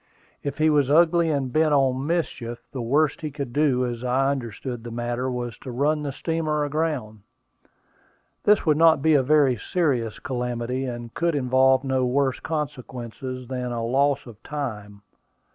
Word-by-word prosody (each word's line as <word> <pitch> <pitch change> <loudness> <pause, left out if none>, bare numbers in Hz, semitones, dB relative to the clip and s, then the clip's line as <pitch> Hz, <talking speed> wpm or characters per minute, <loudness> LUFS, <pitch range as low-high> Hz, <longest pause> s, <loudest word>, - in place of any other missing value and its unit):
If 140 -1 -4
he 155 0 +3
was 145 -3 +3
ugly 170 +2 +4
and 135 -4 -1
bent 155 -1 +3
on 135 0 +1
mischief, 120 -8 -2
the 130 - -4
worst 140 +5 +1
he 155 - -3
could 140 -4 -6
do, 135 -4 +2
as 120 -1 -4
I 130 +2 +2
understood 120 -2 -5
the 120 - -6
matter, 120 +2 -2
was 120 -2 -4
to - - -9
run 145 +5 +1
the 145 -2 -3
steamer 155 0 -1
aground. 145 -8 -2 1.2
This 210 -1 +4
would 155 -2 +3
not 160 -3 +5
be 160 - +4
a 145 - +5
very 140 -2 +3
serious 125 - -1
calamity, 125 0 -3
and 120 -2 -6
could 170 -2 0
involve 130 0 +3
no 130 -1 0
worse 130 +1 +1
consequences 130 -4 -5
than 125 -1 -3
a 115 -1 -2
loss 140 +3 +1
of 115 -3 -13
time. 105 -9 -6
130 Hz, 165 wpm, -24 LUFS, 120-150 Hz, 1.2 s, not